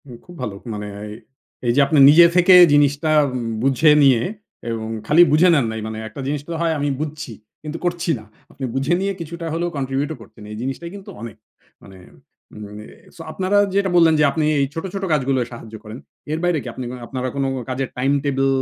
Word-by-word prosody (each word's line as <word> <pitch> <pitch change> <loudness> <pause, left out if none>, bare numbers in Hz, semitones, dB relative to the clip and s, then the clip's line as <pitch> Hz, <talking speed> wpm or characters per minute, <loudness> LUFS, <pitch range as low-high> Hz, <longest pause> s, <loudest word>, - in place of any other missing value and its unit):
হুম, 125 -4 -11
খুব 175 - -13
ভালো। 105 -5 -4 0.2
মানে 105 0 -6 0.2
এই, 105 - -8 0.5
এই - - +4
যে, - - +3
আপনি 150 0 +2
নিজে 165 +4 +8
থেকে 180 +1 +6 0.2
জিনিসটা 145 +2 +2 0.5
বুঝে 135 +3 +4
নিয়ে 130 -4 +5 0.5
এবং 110 -1 -4 0.2
খালি 160 +4 +5
বুঝে 160 +5 +5
নেন 140 -6 +2
নাই। 110 - -5
মানে 110 0 -6
একটা 110 +6 -9
জিনিসটা 145 +3 -4
হয় 165 -1 +1
আমি 145 0 0
বুঝছি। 155 -4 -5 0.3
কিন্তু 155 +1 -5
করছি 175 0 -2
না। 110 - -14 0.3
আপনি 135 - -6
বুঝে 135 +5 0
নিয়ে 195 0 -1
কিছুটা 170 +1 -7
হলেও 170 +1 -1
কন্ট্রিবিউট 135 +2 -2
করছেন। 110 0 -15
এই 105 - -7
জিনিসটাই 135 +7 -5
কিন্তু 195 -1 -11
অনেক। 115 -2 -8 0.5
মানে, 95 -1 -14 0.7
মানে, 105 +1 -10 0.3
সো - - -11
আপনারা 190 +4 0 0.2
যেটা 200 -1 +1
বললেন 165 -2 +5
যে, - - +4
আপনি 155 0 -1
এই 140 - +2
ছোট, 165 - -5
ছোট, 195 -1 -4
কাজগুলো 135 -2 +1
সাহায্য 115 -2 -11
করেন। 110 +2 -9 0.3
এর 155 - -1
বাইরে 175 -2 +1 0.2
আপনি 130 - -6
কি - - -7
আপনারা 130 -1 -4
কোন 140 - -1 0.3
কাজের 130 0 -3
টাইম 135 +2 +1
টেবল 135 -1 0
145 Hz, 195 wpm, -20 LUFS, 125-165 Hz, 0.7 s, নিজে